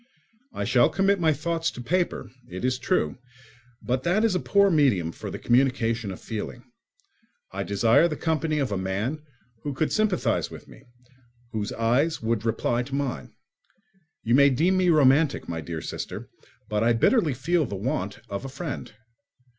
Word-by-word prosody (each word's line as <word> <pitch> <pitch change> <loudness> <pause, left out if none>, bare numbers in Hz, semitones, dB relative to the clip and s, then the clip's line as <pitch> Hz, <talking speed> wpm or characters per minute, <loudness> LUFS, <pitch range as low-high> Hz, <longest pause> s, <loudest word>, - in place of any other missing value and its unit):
I - - -4
shall 120 -2 +4
commit 195 0 +2
my 160 -2 +3
thoughts 165 +2 -1
to - - -10
paper, 175 - -1 0.2
it 95 +6 -5
is 130 0 0
true; 185 - 0 0.6
but 125 +1 0
that 185 +10 +2
is 220 - +2
a 180 - +1
poor 200 +1 +3
medium 125 - +2
for - - -8
the - - -5
communication 120 -3 +1
of 95 - -7
feeling. 105 - -6 0.9
I - - -4
desire 115 +10 +3
the 155 - -3
company 160 -1 -1
of 135 -6 -1
a 100 - -1
man 100 +11 -2 0.4
who 145 -2 -4
could 155 +3 0
sympathise 215 -4 +1
with - - -11
me, - - -16 0.7
whose 105 -2 -3
eyes 125 +8 +1
would 115 -1 -1
reply 120 +1 0
to 135 +2 -5
mine. 140 -3 -3 0.9
You 115 - +1
may 140 +2 +7
deem 165 +8 +2
me 185 -1 +3
romantic, 145 -1 +4
my 80 -1 -4
dear 80 0 -5
sister, - - -6 0.4
but 105 0 -1
I 120 +1 +4
bitterly 150 - +3
feel 155 +3 +1
the 100 - -5
want 100 -1 -3
of 100 +3 -5
a 135 - -5
friend. 140 +1 -6
135 Hz, 170 wpm, -25 LUFS, 115-165 Hz, 0.9 s, may